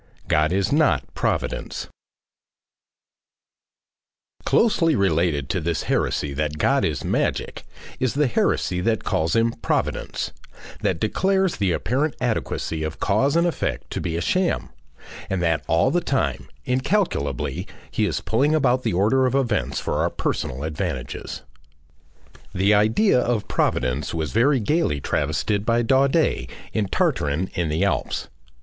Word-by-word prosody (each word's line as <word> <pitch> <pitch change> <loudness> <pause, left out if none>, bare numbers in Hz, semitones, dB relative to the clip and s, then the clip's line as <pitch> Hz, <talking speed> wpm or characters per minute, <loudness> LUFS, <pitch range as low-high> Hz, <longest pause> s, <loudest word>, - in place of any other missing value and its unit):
GOD 75 +1 +2
IS 95 +2 +1
NOT 155 +2 +3
PROVIDENCE - - -2 2.6
Closely 165 -9 +3
related 85 - +1
to - - 0
this 85 0 -1
heresy 70 -1 0
that 75 +1 -2
God - - +2
is - - -1
magic, - - -1 0.3
is 130 -1 0
the 150 +1 +3
heresy 90 -6 +1
that 110 +1 0
calls 80 0 0
him 115 0 +3
Providence, - - -1 0.5
that - - 0
declares 190 - +1
the 100 -3 +1
apparent 140 - 0
adequacy 110 -9 -2
of 80 0 -4
cause 130 +9 +2
and 170 +1 +4
effect 65 - -2
to - - -3
be 85 -1 -2
a - - -1
sham, 180 - 0 0.6
and 95 - 0
that 80 -2 +1
all 85 +11 +3
the 175 +3 +2
time, 130 - -1 0.2
incalculably, 130 - -1 0.2
he - - +1
is - - -2
pulling 140 +7 +2
about 130 -4 +2
the - - -1
order 110 +8 +3
of 130 - -1
events 125 -5 0
for - - -2
our - - +2
personal 65 +3 -3
advantages. 75 0 -4 1.1
The 95 +3 +3
idea 110 - +4
of 120 -4 0
Providence 65 +6 0
was 80 -3 -2
very 130 +5 +3
gaily 115 - +1
travested 80 +10 -1
by 115 +2 +2
Daudet 135 - +2 0.2
in 105 -3 0
"Tartarin 75 0 0
in 85 -3 -1
the 75 +2 +1
Alps." - - -2
105 Hz, 140 wpm, -23 LUFS, -, 2.6 s, and